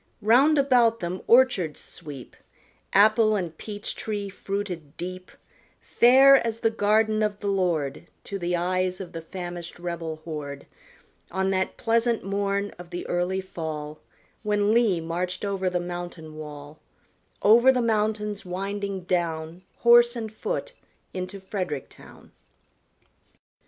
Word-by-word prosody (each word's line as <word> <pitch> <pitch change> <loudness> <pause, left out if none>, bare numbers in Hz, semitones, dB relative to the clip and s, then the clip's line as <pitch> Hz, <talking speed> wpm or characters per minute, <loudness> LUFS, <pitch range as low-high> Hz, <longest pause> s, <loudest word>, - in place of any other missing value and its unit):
Round 265 +8 +5
about 245 -5 +4
them 180 +1 -4
orchards 230 - +4
sweep, 145 -6 -10 0.6
Apple 215 +2 +5
and 175 -5 -3
peach 205 +4 -6
tree 205 -2 -4
fruited 190 -6 -5
deep, 185 +1 -6 0.5
Fair 270 +3 +6
as 230 -2 -2
the 225 - +2
garden 215 0 +2
of 210 -1 -1
the 205 - -8
Lord 170 -8 -1 0.2
To 200 - -5
the 175 0 -1
eyes 185 +1 0
of 185 -3 -7
the 165 - -6
famished 175 0 -7
rebel 170 -2 -4
horde, 145 -3 -6 0.6
On 190 +1 0
that 190 0 -1
pleasant 230 0 +1
morn 200 +1 -1
of 175 -1 -10
the 175 0 -5
early 180 +2 -1
fall 155 -4 -6 0.4
When 210 0 +1
Lee 225 -7 +3
marched 175 +4 -3
over 195 -2 -1
the 180 0 -1
mountain 175 -3 -7
wall, 150 -1 -9 0.6
Over 235 +5 +7
the 255 - 0
mountains 210 -2 0
winding 195 +1 -4
down, 170 -1 -2 0.2
Horse 240 0 +6
and 220 -2 -5
foot, - - -4 0.4
into 185 +2 -5
Frederick 185 -7 -4
town. - - -16
190 Hz, 130 wpm, -25 LUFS, 175-215 Hz, 0.6 s, Over